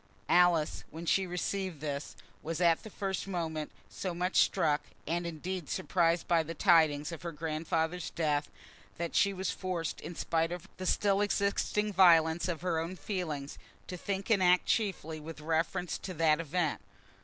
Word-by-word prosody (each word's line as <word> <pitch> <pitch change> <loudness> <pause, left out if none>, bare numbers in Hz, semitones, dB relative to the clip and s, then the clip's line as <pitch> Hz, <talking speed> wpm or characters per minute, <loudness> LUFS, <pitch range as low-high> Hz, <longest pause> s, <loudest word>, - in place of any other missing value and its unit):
Alice, 175 -3 +3
when 165 +2 -8
she 190 +2 +2
received 180 -1 -3
this, 145 -1 -4 0.3
was 165 +1 -4
at 170 -2 +4
the 220 - -9
first 195 -1 -3
moment 160 -5 -3 0.2
so 185 -3 -5
much 180 +2 -1
struck, 150 -6 +3 0.2
and 170 +2 -1
indeed 170 +1 -5
surprised, 170 -2 +1
by 170 -1 +4
the 165 +1 -6
tidings 155 -2 +4
of 165 - -7
her 170 - -4
grandfather's 160 +2 -2
death, 150 -3 0 0.5
that 170 0 -3
she 200 - +4
was 190 -1 -2
forced, 180 -4 -3
in 170 +2 -7
spite 165 +1 0
of 175 -1 -6
the 185 - -4
still 200 +1 +2
existing 205 +1 0
violence 170 -3 +5
of 170 -3 -3
her 175 -3 0
own 165 +3 -4
feelings, 155 -5 -4 0.3
to 180 - -6
think 195 +4 -3
and 200 -4 +4
act 180 0 +4
chiefly 180 -7 -1
with 155 +1 -9
reference 165 +3 -1
to 185 -2 -6
that 155 -1 +3
event. 165 0 -1
170 Hz, 165 wpm, -31 LUFS, 160-185 Hz, 0.5 s, violence